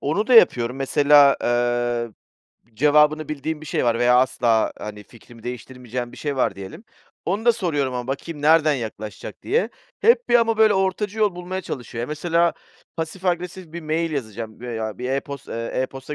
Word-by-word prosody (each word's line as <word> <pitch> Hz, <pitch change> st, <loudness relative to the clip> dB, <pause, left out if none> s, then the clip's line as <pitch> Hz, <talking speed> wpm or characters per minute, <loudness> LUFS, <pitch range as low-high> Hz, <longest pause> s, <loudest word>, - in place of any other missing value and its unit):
Onu 160 Hz, +10 st, -1 dB
da 255 Hz, -, +3 dB
yapıyorum. 125 Hz, -, +5 dB
Mesela, 140 Hz, +1 st, +5 dB
eee, 120 Hz, -1 st, 0 dB, 0.6 s
cevabını 150 Hz, +4 st, +3 dB
bildiğim 155 Hz, +1 st, -4 dB
bir 155 Hz, -, -10 dB
şey -, -, -1 dB
var 115 Hz, -1 st, +2 dB
veya 125 Hz, +1 st, +4 dB
asla, 120 Hz, -3 st, +2 dB
hani, 105 Hz, -1 st, -7 dB
fikrimi 115 Hz, +1 st, -17 dB
değiştirmeyeceğim 125 Hz, 0 st, -6 dB
bir -, -, -12 dB
şey 145 Hz, -2 st, -3 dB
var 115 Hz, -6 st, +1 dB
diyelim. 95 Hz, -, -10 dB, 0.4 s
Onu 200 Hz, +5 st, -2 dB
da 240 Hz, -, +6 dB
soruyorum 150 Hz, -, -1 dB
ama 125 Hz, -1 st, -4 dB
bakayım 145 Hz, +3 st, -5 dB
nereden 155 Hz, 0 st, +5 dB
yaklaşacak 110 Hz, -4 st, -7 dB
diye. 455 Hz, +6 st, +1 dB, 0.3 s
Hep 470 Hz, +1 st, +4 dB
bir -, -, +2 dB
ama, 230 Hz, -1 st, +4 dB
böyle, 220 Hz, -1 st, +5 dB
ortacı 195 Hz, +2 st, -1 dB
yol 210 Hz, -4 st, +2 dB
bulmaya 180 Hz, +1 st, -5 dB
çalışıyor. 125 Hz, -8 st, -6 dB
Ya, -, -, -3 dB
mesela 165 Hz, +3 st, +1 dB, 0.4 s
pasif 165 Hz, +3 st, -5 dB
agresif 180 Hz, -1 st, -3 dB
bir 170 Hz, -, -6 dB
mail 160 Hz, +2 st, -1 dB
yazacağım 110 Hz, -5 st, -5 dB
veya 110 Hz, -4 st, -5 dB
bir 125 Hz, +1 st, -3 dB
e-post 140 Hz, 0 st, -4 dB
eee, 115 Hz, 0 st, -4 dB
e-posta 135 Hz, +2 st, -4 dB
140 Hz, 175 wpm, -22 LUFS, 120-170 Hz, 0.6 s, da